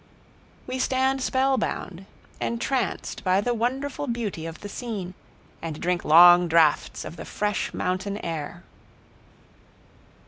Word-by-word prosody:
We 255 +1 -4
stand 265 +1 +1
spellbound, 260 -8 -1 0.3
entranced 245 +3 -2
by 185 0 +3
the 240 +4 0
wonderful 265 +5 -2
beauty 215 -9 -3
of 165 - -9
the 205 - -6
scene, 205 -5 -5 0.5
and 160 -2 -5
drink 180 0 -1
long 175 +2 +8
draughts 160 -2 +2
of 170 - -8
the - - -7
fresh 210 -1 -2
mountain 185 +2 -2
air. 165 +1 -5
200 Hz, 115 wpm, -25 LUFS, 175-250 Hz, 0.5 s, long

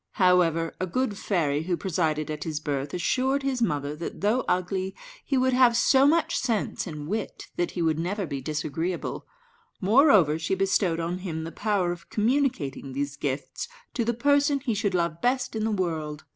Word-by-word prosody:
However, 175 -3 +3
a 185 - -1
good 255 +3 -1
fairy, 155 -8 0
who 175 -1 0
presided 155 -5 -1
at 150 -1 -4
his 155 -2 -3
birth, 140 -2 -3
assured 260 +10 0
his 265 -3 -1
mother 145 -8 0
that, 170 - -6
though 220 +6 +2
ugly, 185 +1 -1 0.3
he 275 - 0
would 260 0 +2
have 250 -2 +5
so 270 +3 +5
much 330 +2 +2
sense 230 -5 -1
and 150 -3 -6
wit 210 +3 -3
that 175 - 0
he 170 - +1
would 160 -1 +1
never 195 +4 -2
be 140 -4 -4
disagreeable; 155 +5 -3 0.5
moreover, 205 - +5
she 165 +4 0
bestowed 190 -3 +1
on 170 +2 -2
him 165 -4 -4
the 165 - -6
power 195 -4 0
of 175 -1 -8
communicating 215 - 0
these 140 +1 -2
gifts 140 -1 -4 0.3
to 235 - 0
the 235 +1 0
person 285 +3 +3
he 250 -4 -1
should 205 -2 0
love 170 -1 -1
best 255 -1 0
in 215 0 -1
the - - +1
world. 160 -7 -2
185 Hz, 185 wpm, -26 LUFS, 160-235 Hz, 0.5 s, have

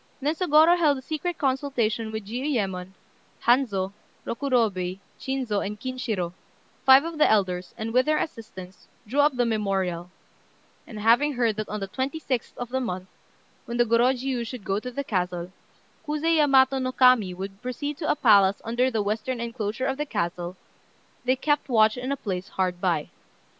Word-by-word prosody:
Then 290 +3 0
Sôgorô 330 0 +4
held 295 -4 +3
a - - -7
secret 320 +4 -3
consultation 255 -5 -1
with 220 -2 -5
Jiuyémon, 205 -7 -2 0.5
Hanzô, 210 -6 +2 0.3
Rokurobei, 220 -8 0 0.2
Chinzô, 255 -6 -2
and 210 +1 -5
Kinshirô, 230 -9 -3 0.5
five 265 +1 +8
of 330 -1 -6
the - - +5
elders, 185 -4 0
and, 225 +1 -4
with 255 +3 +3
their 305 0 +3
assistance, 195 - -7 0.2
drew 255 +7 -2
up 290 -1 +4
the 245 -1 +2
memorial; 190 -6 -1 0.8
and 215 - -8
having 240 +7 +4
heard 235 -4 +1
that 215 - -4
on 210 - -3
the 195 - -3
26th 265 +2 -3
of 245 -1 -5
the 260 +1 -1
month, 185 -6 -4 0.6
when 235 - -4
the 240 - +4
Gorôjiu 245 +2 +1
should 245 -3 -7
go 195 +1 -1
to 250 - -6
the 280 +3 -4
castle, 180 -5 -2 0.6
Kuzé 305 +2 +1
Yamato 270 -2 +4
no 255 0 -1
Kami 250 -8 +4
would 195 +2 -7
proceed 285 +4 -4
to 310 - -2
a - - +3
palace 200 -7 +5
under 240 +3 +1
the 220 -4 -1
western 220 +5 -2
enclosure 230 0 -3
of 270 0 -1
the 295 0 -3
castle, 175 -4 -3 0.7
they 255 +1 +3
kept 290 +2 0
watch 220 -3 +4
in 255 +2 -4
a 280 - -1
place 190 -6 -4
hard 180 -2 -2
by. 170 -5 0
235 Hz, 170 wpm, -25 LUFS, 200-270 Hz, 0.8 s, five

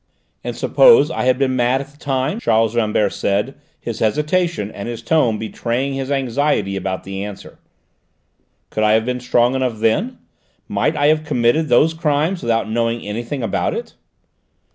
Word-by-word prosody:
"And - - -4
suppose 475 -3 +5
I - - -2
had 130 0 +3
been 130 -1 +1
mad 125 +1 +2
at 140 - -7
the 145 - -23
time," 135 - -1
Charles 115 - +1
Rambert 105 -3 +1
said, 105 +7 -1 0.3
his 115 -2 -5
hesitation 150 - 0
and 100 +4 -6
his 120 - -6
tone 125 -9 +2
betraying 120 +5 -3
his 135 0 -4
anxiety 135 -6 0
about 95 -1 -3
the 95 0 -5
answer, 105 -1 -9 1.1
"could 110 - -2
I 105 0 +4
have 110 0 +2
been 125 0 -2
strong 125 0 +2
enough 130 -4 -1
then? 155 - 0 0.5
Might 155 0 0
I 145 - +2
have 155 0 +2
committed 145 +2 +1
these 155 +7 +4
crimes 160 +2 0
without 115 -3 0
knowing 115 +1 -1
anything 120 +5 -4
about 110 - -1
it?" - - -6
125 Hz, 165 wpm, -19 LUFS, 110-145 Hz, 1.1 s, suppose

